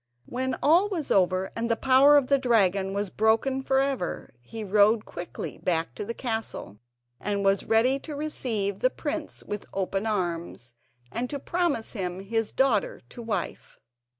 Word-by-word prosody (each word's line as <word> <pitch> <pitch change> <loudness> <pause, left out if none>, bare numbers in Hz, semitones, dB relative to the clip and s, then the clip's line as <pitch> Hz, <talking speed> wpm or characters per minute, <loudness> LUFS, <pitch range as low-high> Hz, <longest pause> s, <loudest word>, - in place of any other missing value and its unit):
When 260 +1 -2
all 345 +7 +5
was 335 -8 -3
over, 185 0 +2
and 230 +1 -2
the 230 - +3
power 270 +4 +6
of 280 - +3
the 275 +1 +3
dragon 200 -6 +2
was 200 -2 -2
broken 225 +5 +2
for 265 0 +1
ever, 270 -8 -1
he 220 - -7
rode 210 +2 +3
quickly 175 0 -7
back 165 -7 -1
to 130 - -5
the 230 +3 -5
castle, 220 - -4 0.4
and 200 -1 -2
was 195 0 +2
ready 240 +5 +3
to 300 +1 -7
receive 225 -10 -2
the 255 - +3
prince 305 +2 -5
with 205 -1 -6
open 195 +2 -1
arms, 170 - -3 0.4
and 245 - -2
to 285 - -3
promise 320 -5 -1
him 185 -4 -4
his 225 +2 -1
daughter 260 -6 +1
to 240 - -9
wife. 225 -2 -4
225 Hz, 165 wpm, -26 LUFS, 195-265 Hz, 0.4 s, power